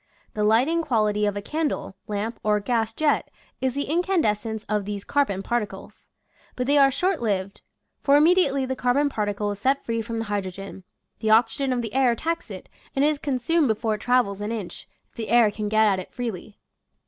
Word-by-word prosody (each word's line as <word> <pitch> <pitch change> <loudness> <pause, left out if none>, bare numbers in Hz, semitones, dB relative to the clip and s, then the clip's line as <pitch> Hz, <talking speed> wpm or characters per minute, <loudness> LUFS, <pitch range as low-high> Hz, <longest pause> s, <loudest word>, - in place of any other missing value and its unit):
The 210 -3 -1
lighting 250 +11 +3
quality 215 -7 +1
of 205 0 -2
a 200 - -5
candle, 300 -6 -2
lamp, 210 +3 -3
or 210 0 +2
gas 225 +1 0
jet 305 -2 0 0.3
is 260 -1 0
the 285 - 0
incandescence 230 - 0
of 210 -2 -1
these 205 -1 -5
carbon 235 -10 0
particles; 210 -5 -4 0.5
but 250 - -2
they 285 +3 +2
are 275 -1 +6
short 360 +5 0
lived 195 -3 -2 0.2
— - - -52
for 280 - +4
immediately 300 -4 +4
the 260 0 -3
carbon 260 +3 +2
particle 205 -3 -2
is 205 - -6
set 270 +5 +1
free 230 -1 -1
from 230 +1 -5
the 225 - -2
hydrogen, 195 -2 -5 0.4
the 220 - -1
oxygen 230 +5 +3
of 245 -1 -1
the 225 - -5
air 265 -1 +3
attacks 330 +8 -3
it - - -9 0.3
and 275 +1 +3
it - - +5
is 300 -2 -2
consumed 285 +3 +1
before 220 0 0
it 210 - -5
travels 245 -5 +1
an 210 +2 -3
inch, 215 -6 -6 0.2
if - - -30
the 225 - -4
air 230 -2 +5
can 210 0 -4
get 220 +1 +4
at 195 -3 +2
it 185 - -8
freely. 220 -4 -6
230 Hz, 205 wpm, -24 LUFS, 210-275 Hz, 0.5 s, are